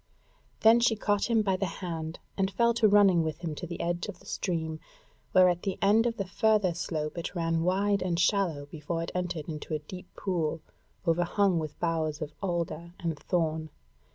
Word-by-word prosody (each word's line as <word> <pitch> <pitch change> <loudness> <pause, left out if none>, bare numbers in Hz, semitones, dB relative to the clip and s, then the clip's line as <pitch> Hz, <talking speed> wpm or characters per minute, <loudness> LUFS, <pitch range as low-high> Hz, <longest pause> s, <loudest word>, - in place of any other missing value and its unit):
Then 225 +2 +7
she 235 -1 +3
caught 205 0 0
him 225 -2 +3
by 190 -2 +1
the 195 - -1
hand, 165 -3 -4 0.2
and 195 -1 +1
fell 235 +4 +2
to 230 -1 +4
running 200 -4 +5
with 155 -1 -3
him 165 -3 -3
to 170 - -6
the 170 - -6
edge 175 +2 -1
of 205 -4 -7
the - - -20
stream, 160 -4 -2 0.5
where 185 0 +7
at 175 -1 +1
the 195 -2 -2
end 215 +4 +4
of 230 - -2
the 195 - -2
further 210 -1 +2
slope 165 -1 -3
it 170 - -5
ran 165 -1 0
wide 195 +3 +2
and 175 -2 0
shallow 175 -6 +1
before 160 +3 -4
it - - -5
entered 180 -4 -3
into 155 0 -4
a 150 -1 -6
deep 180 +3 -9
pool 165 -5 -1 0.5
overhung 175 +2 +2
with 155 -2 -6
boughs 160 -3 -1
of 150 -1 -5
alder 170 -2 -3
and 165 -3 -3
thorn. 160 -3 -1
175 Hz, 195 wpm, -29 LUFS, 160-195 Hz, 0.5 s, Then